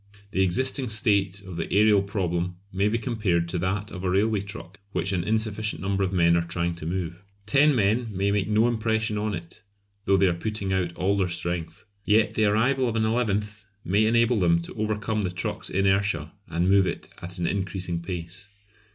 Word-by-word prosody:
The 95 Hz, -, +1 dB
existing 125 Hz, +7 st, +1 dB
state 100 Hz, -3 st, +1 dB
of 95 Hz, -3 st, -8 dB
the 80 Hz, -, -2 dB
aërial 105 Hz, -1 st, +4 dB
problem 90 Hz, -3 st, -1 dB, 0.2 s
may 100 Hz, +2 st, +2 dB
be 110 Hz, +2 st, +1 dB
compared 105 Hz, -8 st, 0 dB
to 90 Hz, -, -2 dB
that 95 Hz, +3 st, -2 dB
of 90 Hz, -1 st, -7 dB
a 95 Hz, -, 0 dB
railway 105 Hz, +3 st, +2 dB
truck 100 Hz, -2 st, -9 dB
which 90 Hz, +3 st, -1 dB
an 90 Hz, -3 st, 0 dB
insufficient 110 Hz, +1 st, -1 dB
number 100 Hz, 0 st, 0 dB
of 95 Hz, -, 0 dB
men 85 Hz, -2 st, +4 dB
are 85 Hz, -, +3 dB
trying 85 Hz, 0 st, -2 dB
to 80 Hz, -, -6 dB
move. 90 Hz, 0 st, -3 dB, 0.2 s
Ten 140 Hz, +7 st, +4 dB
men 115 Hz, +2 st, +2 dB
may 100 Hz, 0 st, 0 dB
make 100 Hz, -2 st, 0 dB
no 110 Hz, +2 st, +3 dB
impression 110 Hz, -2 st, 0 dB
on 105 Hz, -1 st, -1 dB
it, 85 Hz, 0 st, -10 dB, 0.4 s
though 95 Hz, 0 st, +4 dB
they 95 Hz, -, +4 dB
are 90 Hz, -, +3 dB
putting 100 Hz, +2 st, -3 dB
out 90 Hz, -2 st, -1 dB
all 95 Hz, +2 st, +1 dB
their 95 Hz, -2 st, +1 dB
strength. 85 Hz, +1 st, -4 dB, 0.2 s
Yet 105 Hz, 0 st, +3 dB
the 110 Hz, -1 st, +2 dB
arrival 120 Hz, +5 st, +2 dB
of 115 Hz, -, -3 dB
an 110 Hz, -1 st, +2 dB
eleventh 105 Hz, -3 st, -1 dB, 0.2 s
may 105 Hz, +4 st, +3 dB
enable 115 Hz, 0 st, +3 dB
them 85 Hz, -2 st, +3 dB
to -, -, -9 dB
overcome 110 Hz, 0 st, -1 dB
the 95 Hz, -, -1 dB
truck's 90 Hz, -1 st, -4 dB
inertia 95 Hz, -5 st, +1 dB, 0.2 s
and 85 Hz, +2 st, 0 dB
move 95 Hz, 0 st, +4 dB
it -, -, -5 dB
at 90 Hz, +2 st, -6 dB
an 85 Hz, -, -1 dB
increasing 90 Hz, -2 st, -2 dB
pace. 90 Hz, +2 st, -6 dB
100 Hz, 200 wpm, -26 LUFS, 90-110 Hz, 0.4 s, aërial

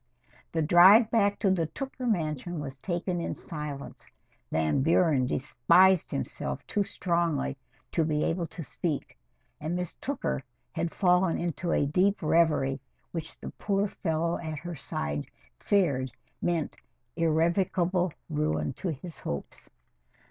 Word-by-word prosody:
The 160 Hz, -1 st, 0 dB
drive 190 Hz, +8 st, +7 dB
back 205 Hz, -3 st, +3 dB
to 195 Hz, -, +2 dB
the 170 Hz, -4 st, +1 dB
Tooker 255 Hz, -, -5 dB
mansion 165 Hz, -, -1 dB
was 135 Hz, -2 st, -6 dB
taken 175 Hz, -1 st, -2 dB
in -, -, -3 dB
silence. 150 Hz, -3 st, -7 dB, 0.4 s
Van 80 Hz, -, +1 dB
Buren 155 Hz, -4 st, +3 dB
despised 170 Hz, +8 st, +4 dB
himself 70 Hz, 0 st, -4 dB
too 205 Hz, -, 0 dB
strongly 170 Hz, -8 st, 0 dB, 0.4 s
to 165 Hz, -, +2 dB
be 150 Hz, -1 st, 0 dB
able 170 Hz, 0 st, 0 dB
to 165 Hz, -, -7 dB
speak, 155 Hz, 0 st, -3 dB, 0.4 s
and 160 Hz, +3 st, -2 dB
Miss 180 Hz, -2 st, -3 dB
Tooker 280 Hz, -, -2 dB, 0.3 s
had 165 Hz, 0 st, -2 dB
fallen 180 Hz, -2 st, +3 dB
into 170 Hz, 0 st, -2 dB
a -, -, +2 dB
deep 185 Hz, +6 st, +2 dB
reverie 155 Hz, -4 st, +3 dB, 0.3 s
which 160 Hz, -2 st, -6 dB
the -, -, -7 dB
poor 200 Hz, 0 st, 0 dB
fellow 165 Hz, -3 st, -1 dB
at 155 Hz, -2 st, -5 dB
her 175 Hz, +4 st, -6 dB
side 75 Hz, -, -4 dB, 0.3 s
feared 140 Hz, -11 st, +1 dB, 0.3 s
meant 170 Hz, -3 st, -1 dB, 0.4 s
irrevocable 170 Hz, +2 st, +2 dB, 0.2 s
ruin 75 Hz, 0 st, -1 dB
to -, -, -5 dB
his 160 Hz, +2 st, -7 dB
hopes. 70 Hz, -, -6 dB
165 Hz, 135 wpm, -28 LUFS, 150-180 Hz, 0.4 s, drive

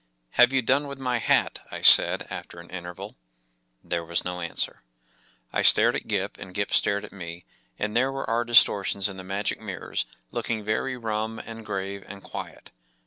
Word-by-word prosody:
“Have 125 Hz, +1 st, +5 dB
you 135 Hz, -2 st, +1 dB
done 140 Hz, +5 st, +1 dB
with 140 Hz, -1 st, -7 dB
my 125 Hz, -2 st, -1 dB
hat?” -, -, +2 dB
I -, -, -7 dB
said, -, -, +8 dB
after 85 Hz, -, -8 dB
an 85 Hz, -, -13 dB
interval 90 Hz, -5 st, -8 dB, 0.7 s
There 85 Hz, -1 st, -3 dB
was 85 Hz, +1 st, -2 dB
no 90 Hz, 0 st, -4 dB
answer.! 85 Hz, -, -3 dB, 0.8 s
stared -, -, +5 dB
at -, -, -5 dB
Gip, -, -, -2 dB
and 90 Hz, -, -10 dB
Gip 100 Hz, 0 st, -2 dB
stared 100 Hz, +1 st, +2 dB
at -, -, -13 dB
me, 85 Hz, -2 st, -9 dB, 0.3 s
and 105 Hz, +1 st, -3 dB
there 130 Hz, +3 st, +2 dB
were 135 Hz, 0 st, -5 dB
our 115 Hz, +2 st, +1 dB
distortions 100 Hz, -4 st, +4 dB
in 100 Hz, -2 st, -7 dB
the 95 Hz, -, -8 dB
magic 100 Hz, +2 st, -3 dB
mirrors, -, -, -4 dB, 0.2 s
looking 110 Hz, -2 st, -3 dB
very 110 Hz, +5 st, -2 dB
rum, 110 Hz, -1 st, -3 dB
and 115 Hz, 0 st, -9 dB
grave, 100 Hz, -1 st, -5 dB
and 100 Hz, -1 st, -10 dB
quiet. -, -, -9 dB
105 Hz, 180 wpm, -25 LUFS, 95-120 Hz, 0.8 s, said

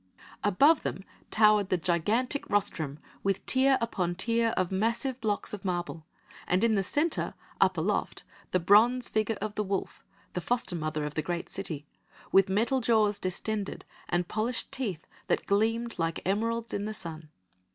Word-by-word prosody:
Above 280 Hz, -, +5 dB
them 190 Hz, -, -4 dB, 0.3 s
towered 210 Hz, -2 st, +4 dB
the 185 Hz, -, +2 dB
gigantic 210 Hz, -, 0 dB
rostrum 165 Hz, -8 st, 0 dB, 0.2 s
with 195 Hz, -1 st, -1 dB
tier 265 Hz, +1 st, +4 dB
upon 180 Hz, -7 st, -1 dB
tier 230 Hz, +4 st, +1 dB
of 185 Hz, -1 st, +1 dB
massive 230 Hz, +6 st, -1 dB
blocks 210 Hz, -2 st, -1 dB
of 205 Hz, -, -6 dB
marble, 175 Hz, -4 st, -3 dB, 0.4 s
and 185 Hz, +4 st, +2 dB
in 230 Hz, -1 st, +4 dB
the 200 Hz, -, +2 dB
centre, 295 Hz, -, -1 dB, 0.2 s
up -, -, +3 dB
aloft, -, -, -1 dB, 0.3 s
the 185 Hz, -, +2 dB
bronze 225 Hz, +8 st, +4 dB
figure 215 Hz, 0 st, 0 dB
of 215 Hz, -, -3 dB
the 210 Hz, -, -1 dB
wolf 195 Hz, -1 st, -3 dB, 0.3 s
the 180 Hz, -, -2 dB
foster 235 Hz, -2 st, -1 dB
mother 155 Hz, -2 st, -2 dB
of 150 Hz, -, -4 dB
the 155 Hz, -, -1 dB
great 175 Hz, +2 st, -3 dB
city 150 Hz, -3 st, -4 dB, 0.5 s
with 195 Hz, 0 st, +5 dB
metal 235 Hz, +7 st, +1 dB
jaws 215 Hz, -3 st, +3 dB
distended 200 Hz, +3 st, -3 dB, 0.2 s
and 175 Hz, 0 st, 0 dB
polished 230 Hz, +3 st, -1 dB
teeth 200 Hz, -, -3 dB, 0.2 s
that -, -, 0 dB
gleamed 225 Hz, +3 st, 0 dB
like 165 Hz, 0 st, 0 dB
emeralds 230 Hz, +4 st, -1 dB
in 205 Hz, -, -2 dB
the 215 Hz, 0 st, -4 dB
sun. 160 Hz, -5 st, -8 dB
205 Hz, 160 wpm, -29 LUFS, 180-230 Hz, 0.5 s, Above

